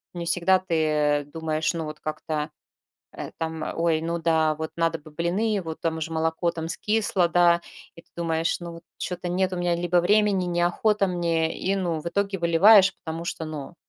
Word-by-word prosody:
не 170 Hz, -1 st, -4 dB
всегда 180 Hz, +2 st, +3 dB
ты 155 Hz, -5 st, +1 dB
думаешь, 155 Hz, -1 st, -1 dB
ну 165 Hz, -2 st, -3 dB
вот 150 Hz, 0 st, -7 dB
как-то, 155 Hz, 0 st, -4 dB, 0.6 s
э, -, -, -7 dB
там: 160 Hz, -1 st, -4 dB, 0.2 s
"Ой, 165 Hz, -2 st, +2 dB
ну 170 Hz, +1 st, -2 dB
да, 160 Hz, -1 st, +2 dB
вот 160 Hz, +1 st, -5 dB
надо 165 Hz, -1 st, 0 dB
бы 155 Hz, -, -14 dB
блины, 190 Hz, +7 st, -1 dB
вот 160 Hz, -2 st, -7 dB
там 160 Hz, -1 st, -2 dB
же 160 Hz, +1 st, -4 dB
молоко 160 Hz, +1 st, 0 dB
там 160 Hz, -1 st, -5 dB
скисло, 205 Hz, -1 st, 0 dB
да". 170 Hz, 0 st, +4 dB, 0.3 s
И 170 Hz, -, -13 dB
ты -, -, -38 dB
думаешь: 165 Hz, -1 st, 0 dB
"Ну 170 Hz, -1 st, -7 dB
вот 165 Hz, -, -12 dB
чё-то 180 Hz, 0 st, -4 dB
нет 185 Hz, +1 st, 0 dB
у -, -, -2 dB
меня 175 Hz, -1 st, 0 dB
либо 175 Hz, +1 st, 0 dB
времени, 205 Hz, 0 st, +3 dB
неохота 175 Hz, +4 st, +1 dB
мне", 170 Hz, -3 st, 0 dB
и, 195 Hz, +1 st, -1 dB
ну, 170 Hz, -4 st, -1 dB
в 170 Hz, -, -6 dB
итоге 195 Hz, +2 st, -1 dB
выливаешь. 190 Hz, +4 st, +6 dB
Потому 165 Hz, +1 st, -7 dB
что, 165 Hz, -1 st, -4 dB
ну 155 Hz, +1 st, -7 dB
170 Hz, 190 wpm, -25 LUFS, 160-180 Hz, 0.6 s, выливаешь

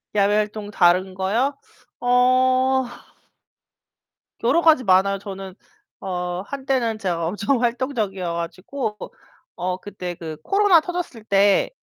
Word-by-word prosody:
야외 205 Hz, +1 st, +3 dB
활동 210 Hz, 0 st, -2 dB
다른 185 Hz, +1 st, +3 dB
거요? 235 Hz, +9 st, 0 dB, 0.4 s
어 255 Hz, +1 st, +3 dB, 1.6 s
여러 335 Hz, -, +3 dB
가지 315 Hz, -6 st, +5 dB
많아요. 195 Hz, 0 st, +3 dB
저는 195 Hz, -2 st, -8 dB, 0.5 s
어 180 Hz, -1 st, -3 dB
한때는 260 Hz, -4 st, -1 dB
제가 175 Hz, -5 st, -2 dB
엄청 210 Hz, +7 st, 0 dB
활동적이어 230 Hz, -8 st, -1 dB
가지고 185 Hz, +7 st, -4 dB, 0.6 s
어 180 Hz, 0 st, -2 dB
그때 185 Hz, -2 st, -7 dB
그 160 Hz, -2 st, -7 dB
코로나 395 Hz, -4 st, +4 dB
터졌을 345 Hz, -10 st, -5 dB
때 200 Hz, -1 st, +3 dB
210 Hz, 230 characters per minute, -22 LUFS, 185-255 Hz, 1.6 s, 가지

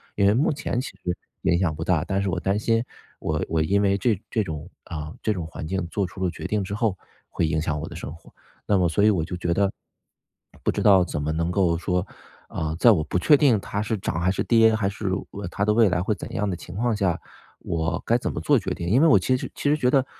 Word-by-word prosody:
因 100 Hz, -, +2 dB
为 100 Hz, -, +5 dB
目 135 Hz, +8 st, +2 dB
前 140 Hz, -4 st, -2 dB
其 -, -, -6 dB
实 90 Hz, 0 st, -3 dB, 0.3 s
影 85 Hz, -, +3 dB
响 85 Hz, -5 st, 0 dB
不 80 Hz, -, -4 dB
大， 80 Hz, -3 st, +1 dB
但 95 Hz, -, -1 dB
是 100 Hz, -, -1 dB
我 90 Hz, -1 st, -1 dB
担 95 Hz, +3 st, 0 dB
心 115 Hz, +1 st, +1 dB, 0.4 s
我 -, -, -1 dB
我 80 Hz, -1 st, 0 dB
因 95 Hz, +6 st, +2 dB
为 100 Hz, -1 st, +3 dB
这 105 Hz, -1 st, +1 dB
这 110 Hz, -, +1 dB
种 80 Hz, -2 st, -6 dB, 0.2 s
啊， 75 Hz, -2 st, -6 dB
这 110 Hz, -, +1 dB
种 90 Hz, -5 st, -4 dB
环 80 Hz, -1 st, -7 dB
境 95 Hz, +2 st, -2 dB
做 100 Hz, +3 st, -1 dB
出 95 Hz, +2 st, -7 dB
了 90 Hz, -, +2 dB
决 -, -, -8 dB
定 105 Hz, -2 st, 0 dB
之 95 Hz, -, -5 dB
后， 105 Hz, -3 st, 0 dB, 0.3 s
会 85 Hz, -, 0 dB
影 80 Hz, 0 st, 0 dB
响 75 Hz, -2 st, -2 dB
我 -, -, -5 dB
的 -, -, -9 dB
生 75 Hz, -, -6 dB
活。 85 Hz, -, -18 dB, 0.4 s
那 100 Hz, -, +3 dB
么 90 Hz, -2 st, +3 dB
所 100 Hz, +5 st, +1 dB
以 105 Hz, -, +6 dB
我 90 Hz, -6 st, 0 dB
就 90 Hz, -, -5 dB
觉 85 Hz, -1 st, 0 dB
得 100 Hz, +2 st, +2 dB, 0.9 s
不 -, -, +2 dB
知 -, -, -2 dB
道 95 Hz, -3 st, +6 dB
怎 80 Hz, -4 st, -3 dB
么 75 Hz, +2 st, -1 dB
能 85 Hz, +2 st, -1 dB
够 90 Hz, -3 st, +2 dB
说， 90 Hz, +1 st, -1 dB, 0.4 s
呃， 80 Hz, 0 st, -3 dB
在 120 Hz, -, +7 dB
我 85 Hz, -8 st, +2 dB
不 85 Hz, +3 st, -1 dB
确 150 Hz, -, +6 dB
定 135 Hz, -7 st, +4 dB
它 100 Hz, +1 st, -3 dB
是 110 Hz, +1 st, -1 dB
涨 90 Hz, -3 st, -3 dB
还 90 Hz, +2 st, +2 dB
是 95 Hz, -, -1 dB
跌， 115 Hz, -1 st, +5 dB
还 105 Hz, -3 st, 0 dB
是 100 Hz, 0 st, -4 dB, 0.4 s
它 100 Hz, -, -1 dB
的 105 Hz, -, +3 dB
未 110 Hz, -2 st, +5 dB
来 90 Hz, 0 st, 0 dB
会 105 Hz, +4 st, 0 dB
怎 -, -, -8 dB
样 105 Hz, +1 st, -1 dB
的 90 Hz, -, -2 dB
情 85 Hz, +1 st, -10 dB
况 120 Hz, +2 st, 0 dB
下， 95 Hz, -5 st, 0 dB, 0.4 s
我 80 Hz, +1 st, -2 dB
该 115 Hz, -, +3 dB
怎 125 Hz, -, -3 dB
么 -, -, -4 dB
做 145 Hz, -, +3 dB
决 95 Hz, -2 st, -4 dB
定？ 85 Hz, -, -5 dB
因 115 Hz, +10 st, +4 dB
为 165 Hz, -, +6 dB
我 145 Hz, -, +7 dB
其 130 Hz, +8 st, +1 dB
实 125 Hz, -, -4 dB
其 -, -, -3 dB
实 150 Hz, -, +4 dB
觉 130 Hz, -5 st, +1 dB
得 135 Hz, -1 st, +3 dB
95 Hz, 290 characters per minute, -24 LUFS, 85-110 Hz, 0.9 s, 在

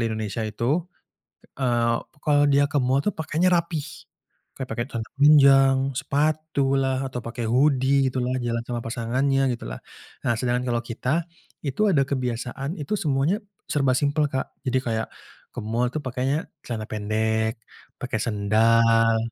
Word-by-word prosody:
di 115 Hz, -, +1 dB
Indonesia 110 Hz, 0 st, -3 dB
itu, 120 Hz, +10 st, -1 dB, 0.7 s
eee, 120 Hz, -3 st, +1 dB, 0.3 s
kalau 145 Hz, -1 st, +4 dB
dia 140 Hz, 0 st, +4 dB
ke 145 Hz, -, +1 dB
mall 130 Hz, +2 st, +2 dB
itu 210 Hz, -, +2 dB
pakainya 160 Hz, +3 st, 0 dB
rapi. 170 Hz, -2 st, 0 dB, 0.8 s
Kayak 130 Hz, -2 st, -5 dB
pakai 120 Hz, +1 st, -2 dB
celana 115 Hz, -3 st, -5 dB
panjang, 135 Hz, -2 st, +6 dB, 0.2 s
sepatu 150 Hz, -1 st, 0 dB
lah 135 Hz, 0 st, 0 dB
atau 125 Hz, -, -2 dB
pakai 115 Hz, 0 st, -5 dB
hoodie 135 Hz, +1 st, +3 dB
gitu 130 Hz, -, -3 dB
lah, 125 Hz, -, -1 dB
jalan 115 Hz, -1 st, -2 dB
sama 120 Hz, -1 st, -3 dB
pasangannya 130 Hz, +3 st, 0 dB
gitu 120 Hz, -, -8 dB
lah. -, -, -7 dB, 0.5 s
Nah 120 Hz, -, +3 dB
sedangkan 125 Hz, 0 st, 0 dB
kalau 120 Hz, 0 st, 0 dB
kita, 130 Hz, +8 st, -1 dB, 0.4 s
itu 140 Hz, +8 st, -2 dB
ada 140 Hz, -5 st, +3 dB
kebiasaan 130 Hz, +2 st, -3 dB
itu 145 Hz, +6 st, -3 dB
semuanya 150 Hz, +7 st, +1 dB, 0.3 s
serba 135 Hz, -3 st, +1 dB
simpel 145 Hz, +1 st, +1 dB
Kak. 130 Hz, -, -3 dB
Jadi 130 Hz, 0 st, +1 dB
kayak 110 Hz, -1 st, -2 dB, 0.5 s
ke -, -, -5 dB
mall 120 Hz, +3 st, 0 dB
tuh 155 Hz, -, -1 dB
pakainya 130 Hz, +4 st, -2 dB, 0.2 s
celana 110 Hz, -3 st, -4 dB
pendek, 110 Hz, +1 st, -1 dB, 0.4 s
pakai 125 Hz, -4 st, -4 dB
sendal, 115 Hz, +1 st, +3 dB
130 Hz, 150 wpm, -24 LUFS, 115-140 Hz, 0.8 s, panjang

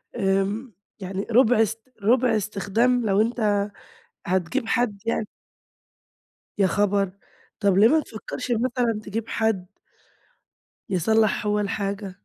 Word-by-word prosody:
آمم، 200 Hz, +3 st, 0 dB, 0.3 s
يعني 190 Hz, +1 st, -4 dB
رُبع 240 Hz, -1 st, +5 dB
إست 225 Hz, +3 st, -3 dB
رُبع 245 Hz, +1 st, +3 dB
إستخدام 220 Hz, +4 st, 0 dB
لو 200 Hz, 0 st, +3 dB
أنت 215 Hz, -3 st, +1 dB, 0.6 s
هتجيب 190 Hz, +7 st, -1 dB
حد 225 Hz, -4 st, 0 dB
يعني. 230 Hz, -1 st, -1 dB, 1.3 s
يا 195 Hz, -2 st, +4 dB
خبر! 200 Hz, 0 st, +1 dB, 0.5 s
طَب 200 Hz, -2 st, +2 dB
ليه 210 Hz, +3 st, +7 dB
ما 315 Hz, +5 st, +4 dB
تفكّرش 250 Hz, 0 st, -6 dB
مثلًا 235 Hz, -1 st, 0 dB
تجيب 220 Hz, +2 st, -4 dB
حد 220 Hz, -5 st, 0 dB, 1.2 s
يصلّح 215 Hz, +4 st, +2 dB
هو 210 Hz, 0 st, +1 dB
الحاجة. 200 Hz, -1 st, -3 dB
215 Hz, 115 wpm, -24 LUFS, 195-230 Hz, 1.3 s, ليه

